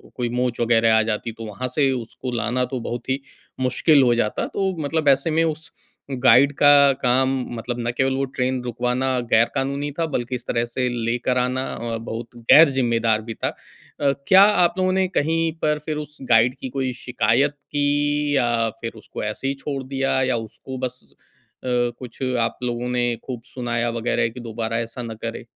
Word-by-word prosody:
कोई 120 -2 -2
मोच 125 0 -1
वग़ैरह 115 -1 +4
आ - - +4
जाती, 110 +1 -2
तो 115 0 -9
वहाँ 110 +4 -4
से 135 +2 +1
उसको 125 0 -5
लाना 120 +3 0
तो 130 0 -4
बहुत 120 +1 -5
ही 135 +1 0 0.4
मुश्किल 130 +4 +3
हो 120 -2 +4
जाता। 105 -2 0
तो 190 -1 -1
मतलब 155 +1 -1
ऐसे 140 +4 +3
में 160 +1 +2
उस 160 0 -3 0.5
गाइड 135 +2 +6
का 145 -1 +7
काम, 130 +2 +3 0.3
मतलब 120 +2 -4
ना 120 0 -1
केवल 130 +2 0
वो 135 - 0
ट्रेन 130 -1 -2
रुकवाना 125 +2 -1
ग़ैर-कानूनी 135 +5 +1
था, 165 - +2
बल्कि 130 -5 -3
इस 125 - -7
तरह 115 0 0
से 125 +2 -2
लेकर 120 +1 -1
आना 125 +1 0
अ, 115 -1 -4
बहुत 115 +1 -6
ग़ैर-ज़िम्मेदार 120 -4 +4
भी 115 +1 -6
था। - - -2 0.5
अ, 140 -1 +3 0.2
क्या 190 +1 +8
आप 200 -4 +4
लोगों 185 0 +2
ने 190 0 +2
कहीं 165 -1 0
पर 150 -1 +1
फिर 155 -1 -2
उस 150 0 -7
गाइड 120 +2 +4
की 130 - -5
कोई 130 0 -2
शिकायत 125 +2 +1
की, 145 +1 0
या 120 -3 +1
फिर 115 -1 -3
उसको 110 - -8
ऐसे 105 +5 -3
ही 135 - 0
छोड़ 140 -2 -3
दिया, 135 0 0
या 130 -1 +1
उसको 115 +4 -8
बस 125 0 -5 0.6
अ, - - -6 0.3
कुछ 125 -1 -10 0.2
आप 115 - -1
लोगों 120 0 -2
ने 120 -1 0
ख़ूब 125 -3 -5
सुनाया 120 -2 -2
वग़ैरह 115 0 0
कि 115 - -10
दोबारा 115 -1 -3
ऐसा 115 +2 -5
ना 115 -1 -5
करे? 115 0 -5
125 Hz, 190 wpm, -22 LUFS, 115-140 Hz, 0.6 s, क्या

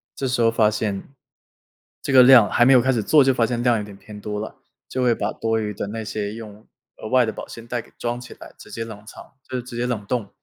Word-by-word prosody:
这 135 - -3
时 125 -1 0
候 115 0 +4
发 110 -2 +3
现 105 -2 -2 1.0
这 - - -3
个 130 -1 +8
量 125 -4 +7
还 120 - +3
没 135 - +6
有 125 - +6
开 130 - +2
始 120 -4 0
做， 145 +7 +5
就 135 0 +3
发 120 -2 +2
现 120 +1 -2
量 120 -2 +3
有 105 - -3
点 100 -1 -11
偏 105 +1 -12
多 105 0 -5
了。 110 - -7 0.3
就 130 - -3
会 120 -2 +3
把 105 +1 -2
多 115 0 -1
余 105 -1 -3
的 100 - -5
那 110 +1 -5
些 105 0 -4
用 110 -2 -11 0.3
额 - - -8
外 125 +1 +3
的 110 - -2
保 - - -9
鲜 115 0 -10
袋 120 0 -3
给 - - -22
装 120 0 -3
起 125 - -11
来， - - -14
直 - - -14
接 115 - -5
冷 110 -2 -10
藏 - - -11 0.3
就 130 - -5
是 125 - -3
直 120 -1 -9
接 125 +1 -1
冷 110 -5 -3
冻。 115 -2 -3
115 Hz, 300 characters per minute, -22 LUFS, 105-125 Hz, 1.0 s, 个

